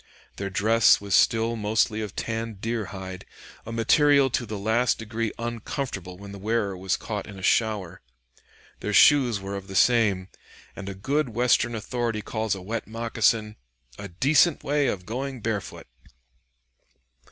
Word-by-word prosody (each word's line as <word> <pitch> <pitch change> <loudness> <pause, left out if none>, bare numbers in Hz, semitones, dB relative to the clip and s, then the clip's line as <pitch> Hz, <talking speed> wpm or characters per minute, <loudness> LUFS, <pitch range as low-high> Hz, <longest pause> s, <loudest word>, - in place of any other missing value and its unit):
Their 100 0 -3
dress 110 +4 +4
was 100 -1 -5
still 115 +2 +3
mostly 110 0 0
of 105 -3 -6
tanned 115 -2 -4
deer 115 0 -2
hide, 95 0 -8 0.4
a - - -5
material 140 +4 +4
to 120 0 -1
the 105 0 -5
last 110 +4 +1
degree 115 0 -3
uncomfortable 115 - -5
when 100 +1 -10
the 100 - -9
wearer 105 -1 -1
was 95 0 -1
caught 105 -2 -5
in 100 -2 -10
a 95 - -10
shower. 100 -6 0 0.8
Their - - -3
shoes 125 -7 +5
were 100 +1 -6
of 100 -1 -7
the 95 - -8
same, 100 -5 +3 0.5
and 100 0 -7
a 95 - -6
good 140 +8 -1
Western 120 0 +2
authority 115 0 -3
calls 110 -2 -2
a 95 - -9
wet 115 +4 -4
moccasin 115 -1 0 0.4
"a 100 - -6
decent 145 - +3
way 145 -1 +1
of 90 -2 -3
going 130 +4 -4
barefoot." 105 -4 -4
110 Hz, 155 wpm, -25 LUFS, 100-120 Hz, 0.8 s, shoes